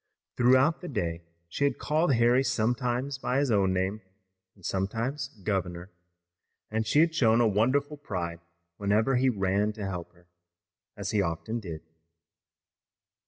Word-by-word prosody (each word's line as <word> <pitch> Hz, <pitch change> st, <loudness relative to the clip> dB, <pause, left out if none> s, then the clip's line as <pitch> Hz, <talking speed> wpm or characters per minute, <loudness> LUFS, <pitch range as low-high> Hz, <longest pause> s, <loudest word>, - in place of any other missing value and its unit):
Throughout 130 Hz, +6 st, +4 dB
the 180 Hz, -, -6 dB
day 85 Hz, -, -2 dB, 0.3 s
she 85 Hz, -, -3 dB
had 140 Hz, -3 st, +2 dB
called 155 Hz, 0 st, +1 dB
Harry 120 Hz, +3 st, +4 dB
sometimes 125 Hz, +2 st, -1 dB
by 125 Hz, 0 st, -1 dB
his 140 Hz, -3 st, +1 dB
own 100 Hz, -3 st, +3 dB
name 95 Hz, +3 st, -1 dB, 0.5 s
and 95 Hz, -4 st, -16 dB
sometimes 115 Hz, +8 st, -2 dB, 0.2 s
"governor," 90 Hz, -2 st, -2 dB, 0.8 s
and 110 Hz, 0 st, -1 dB
she 145 Hz, +7 st, +4 dB
had 165 Hz, 0 st, +3 dB
shown 115 Hz, -8 st, +4 dB
a 120 Hz, -, +4 dB
wonderful 130 Hz, +8 st, +1 dB
pride 85 Hz, -, -4 dB, 0.4 s
whenever 110 Hz, +6 st, +2 dB
he 130 Hz, +1 st, +3 dB
ran 100 Hz, -1 st, 0 dB
to 105 Hz, -2 st, -6 dB
help 90 Hz, -3 st, -5 dB
her, 85 Hz, 0 st, -24 dB, 0.7 s
as 100 Hz, 0 st, -3 dB
he 105 Hz, -2 st, +2 dB
often 95 Hz, +7 st, -2 dB
did. 85 Hz, -7 st, -7 dB
110 Hz, 145 wpm, -28 LUFS, 95-130 Hz, 0.8 s, Throughout